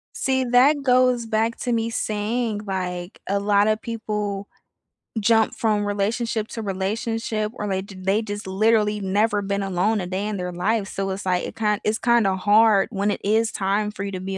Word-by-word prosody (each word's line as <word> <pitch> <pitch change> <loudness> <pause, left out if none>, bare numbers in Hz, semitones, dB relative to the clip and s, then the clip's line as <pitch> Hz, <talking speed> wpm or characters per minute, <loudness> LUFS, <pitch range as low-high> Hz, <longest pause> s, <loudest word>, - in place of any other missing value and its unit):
See, 260 -1 +1
that 260 +4 +4
goes 250 -2 +3
back 225 +1 0
to 245 - -2
me 230 0 0
saying, 215 0 -2
like, 180 -1 -4
a 200 +1 +1
lotta 205 +1 +3
people 210 -3 -4 0.7
jump 220 +1 +3
from 210 -2 +1
relationship 215 +2 -1
to 225 - -6
relationship 215 +2 -2
or 210 - -4
they 190 -1 -1
j 195 0 -11
they 195 +3 +1
just 205 -2 -6
literally 210 +1 +2
never 205 +2 +1
been 200 0 -2
alone 195 +3 +1
a 180 - -4
day 190 +3 -2
in 210 -1 -3
their 180 -1 -4
life, 195 +4 0
so, 195 0 -3
it's, 190 +1 -5
like, 180 -1 +1
it - - -7
kin 210 -2 0
it's 215 +1 0
kinda 230 -5 +3
hard 205 +1 +4
when 200 -1 0
it - - -4
is 220 +2 +2
time 205 +2 0
for 200 -1 -6
you 200 - -4
to 185 - -5
be 190 +1 -4
210 Hz, 190 wpm, -23 LUFS, 195-225 Hz, 0.7 s, that